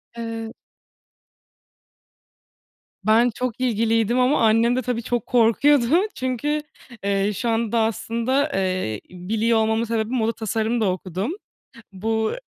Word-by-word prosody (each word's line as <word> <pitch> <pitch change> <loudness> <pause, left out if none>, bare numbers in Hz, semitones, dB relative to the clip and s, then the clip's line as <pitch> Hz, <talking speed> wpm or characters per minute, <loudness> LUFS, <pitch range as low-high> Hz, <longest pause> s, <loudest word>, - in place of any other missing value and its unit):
Eee 225 -1 -5 2.5
Ben 225 +3 +4
çok 250 -1 -3
ilgiliydim 230 0 +1
ama 255 +2 +3
annem 230 +2 +3
de 255 - 0
tabii 240 -1 -3
çok 240 -2 -2
korkuyordu. 245 +3 +4 0.3
Çünkü, 260 +4 -1 0.4
eee, 200 +1 +1
şu 235 - -2
anda 230 0 0
aslında, 230 +6 0
eee, 185 - -1
biliyor 220 +6 0
olmamın 220 +1 +1
sebebi 225 -1 -1
moda 230 -2 +1
tasarım 220 +2 -1
da 195 -3 +2
okudum. 185 - -4 0.6
Bu 220 +3 -1
225 Hz, 115 wpm, -22 LUFS, 220-240 Hz, 2.5 s, Ben